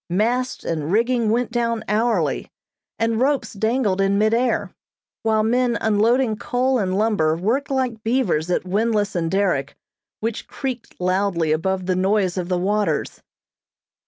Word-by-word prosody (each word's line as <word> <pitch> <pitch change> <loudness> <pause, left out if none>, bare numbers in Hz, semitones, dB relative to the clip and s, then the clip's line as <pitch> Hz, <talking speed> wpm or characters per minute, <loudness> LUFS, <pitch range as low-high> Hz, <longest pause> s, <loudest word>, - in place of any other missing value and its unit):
Masts 235 +8 0
and 155 -1 -2
rigging 235 +1 +2
went 240 +2 0
down 230 -2 -1
hourly, 225 +3 0 0.5
and 225 0 0
ropes 270 -4 +1
dangled 220 -2 0
in 195 0 +2
mid 215 +2 +2
air, 240 +1 +1 0.5
while 220 -1 +2
men 240 +1 +1
unloading 220 +2 +2
coal 255 +3 0
and 190 -2 0
lumber 200 -8 +2
worked 235 +11 -1
like 255 -5 -1
beavers 220 -9 0
at 180 - 0
windlass 210 +1 0
and 165 -2 0
derrick, 185 -8 0 0.4
which 225 0 -3
creaked 255 -4 -6
loudly 180 -3 +1
above 185 +4 0
the 185 0 0
noise 190 -1 +1
of 180 -1 -3
the 180 - +1
waters. 205 +3 -1
215 Hz, 145 wpm, -22 LUFS, 185-235 Hz, 0.5 s, rigging